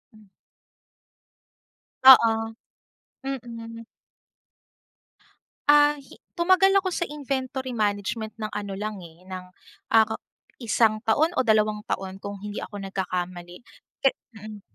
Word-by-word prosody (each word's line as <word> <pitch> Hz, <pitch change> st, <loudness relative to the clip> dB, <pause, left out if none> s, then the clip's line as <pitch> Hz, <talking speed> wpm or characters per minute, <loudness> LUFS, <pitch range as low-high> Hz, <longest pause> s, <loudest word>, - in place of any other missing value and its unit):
Mm. 215 Hz, -1 st, -19 dB, 1.8 s
Oo, 255 Hz, -4 st, +10 dB, 0.9 s
mm. 230 Hz, -3 st, -6 dB, 1.9 s
Ah, 295 Hz, 0 st, +6 dB
hi 275 Hz, -, -16 dB, 0.2 s
tumagal 370 Hz, +2 st, +4 dB
ako 375 Hz, -, -2 dB
sa 345 Hz, -1 st, -2 dB
inventory 265 Hz, -3 st, -4 dB
management 210 Hz, +1 st, -2 dB
ng 215 Hz, -, -2 dB
ano 205 Hz, -1 st, -5 dB
lang 210 Hz, +2 st, -4 dB
eh, 165 Hz, +1 st, -15 dB
ng 185 Hz, -1 st, -6 dB, 0.5 s
ah 225 Hz, -1 st, +7 dB
ka 220 Hz, -, -2 dB, 0.5 s
isang 220 Hz, -1 st, +2 dB
taon 310 Hz, +10 st, +2 dB
o -, -, +5 dB
dalawang 215 Hz, -1 st, +2 dB
taon, 190 Hz, 0 st, -4 dB
kung 200 Hz, 0 st, -6 dB
hindi 210 Hz, 0 st, -6 dB
ako 205 Hz, -2 st, -7 dB
nagkakamali. 180 Hz, -2 st, -5 dB, 0.4 s
Pe 270 Hz, -, +5 dB, 0.3 s
mm. 210 Hz, -1 st, -9 dB
220 Hz, 115 wpm, -25 LUFS, 205-265 Hz, 1.9 s, Oo